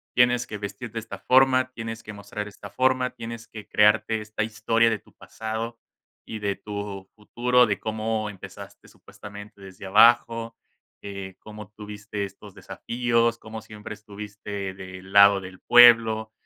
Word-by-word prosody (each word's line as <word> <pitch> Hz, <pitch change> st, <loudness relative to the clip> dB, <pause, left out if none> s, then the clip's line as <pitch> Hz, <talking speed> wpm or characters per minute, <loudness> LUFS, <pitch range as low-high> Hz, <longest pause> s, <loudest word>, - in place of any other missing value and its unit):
Tienes 125 Hz, 0 st, +4 dB
que 105 Hz, -, -6 dB
vestir 105 Hz, +3 st, -7 dB
de 115 Hz, -, -4 dB
esta 105 Hz, -3 st, -9 dB
forma, 130 Hz, +1 st, +4 dB
tienes 115 Hz, -1 st, -7 dB
que 105 Hz, -, -8 dB
mostrar 105 Hz, +1 st, -7 dB
esta 100 Hz, 0 st, -11 dB
forma. 130 Hz, +1 st, +1 dB
Tienes 115 Hz, 0 st, -8 dB
que 105 Hz, -2 st, -10 dB
crearte 110 Hz, +1 st, +3 dB
esta 105 Hz, 0 st, -3 dB
historia 115 Hz, +2 st, +2 dB
de 110 Hz, -3 st, -1 dB
tu -, -, -25 dB
pasado, 115 Hz, +1 st, -6 dB, 0.5 s
y 110 Hz, -, -6 dB
de 100 Hz, -1 st, -1 dB
tu 100 Hz, -2 st, -7 dB
futuro. 125 Hz, +3 st, +2 dB
De 100 Hz, -, -1 dB
cómo 110 Hz, 0 st, -2 dB
empezaste, 95 Hz, -3 st, -11 dB
supuestamente, 105 Hz, 0 st, -13 dB
desde 95 Hz, 0 st, -11 dB
abajo. 115 Hz, +2 st, +4 dB, 0.5 s
Eh, 100 Hz, -2 st, -7 dB
cómo 105 Hz, -2 st, -11 dB
tuviste 105 Hz, 0 st, -6 dB
estos 100 Hz, -, -13 dB
desafíos. 115 Hz, -1 st, -1 dB
Cómo 110 Hz, 0 st, -8 dB
siempre 105 Hz, -1 st, -9 dB
estuviste 100 Hz, -2 st, -7 dB
del 95 Hz, 0 st, -10 dB
lado 100 Hz, -1 st, +7 dB
del 90 Hz, 0 st, -11 dB
pueblo. 115 Hz, -2 st, +6 dB
110 Hz, 150 wpm, -25 LUFS, 100-115 Hz, 0.5 s, lado